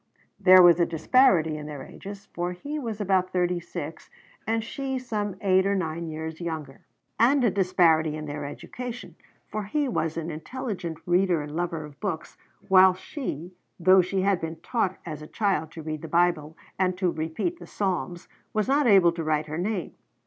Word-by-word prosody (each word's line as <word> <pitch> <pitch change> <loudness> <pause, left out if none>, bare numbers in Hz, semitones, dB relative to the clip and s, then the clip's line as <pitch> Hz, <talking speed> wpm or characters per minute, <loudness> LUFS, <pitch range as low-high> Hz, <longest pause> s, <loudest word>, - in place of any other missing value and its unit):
There 185 -2 +8
was 175 -1 +7
a 170 - +4
disparity 165 - +3
in 150 0 -7
their 145 -2 -7
ages, 200 0 -10
for 175 +1 -2
he 290 +12 -5
was 225 -6 -4
about 190 -2 +1
thirty 180 -1 +1
six 165 -2 -7 0.4
and 225 0 0
she 265 +3 -3
some 210 -6 -3
eight 190 -1 +4
or 200 - +1
nine 165 -2 -3
years 160 +1 -6
younger; 155 -5 -5 0.4
and 255 +4 +4
a 230 - +4
disparity 165 -5 +3
in 155 0 -6
their 150 0 -5
education, 245 - -7 0.3
for 215 -1 -4
he 290 +7 0
was 165 -9 -1
an 165 0 -3
intelligent 180 - -5
reader 175 -3 +2
and 150 +1 -8
lover 170 -2 -2
of 145 -1 -14
books, 190 -6 -4 0.3
while 190 -1 +7
she, 185 - -6 0.3
though 185 +2 +6
she 185 +2 -1
had 195 -2 +2
been 165 0 -4
taught 225 -6 -1
as 155 -3 -6
a 150 - -9
child 195 -6 0
to 160 - -8
read 155 -1 -4
the 165 - -6
Bible 170 -2 +1 0.2
and 185 -1 +1
to 185 -2 +1
repeat 160 - -3
the - - -11
Psalms, 175 -4 -3 0.3
was 215 0 0
not 280 0 +3
able 190 -5 +6
to 165 -1 -5
write 155 -1 0
her 155 +2 -5
name. 195 -1 -2
180 Hz, 185 wpm, -26 LUFS, 160-205 Hz, 0.4 s, There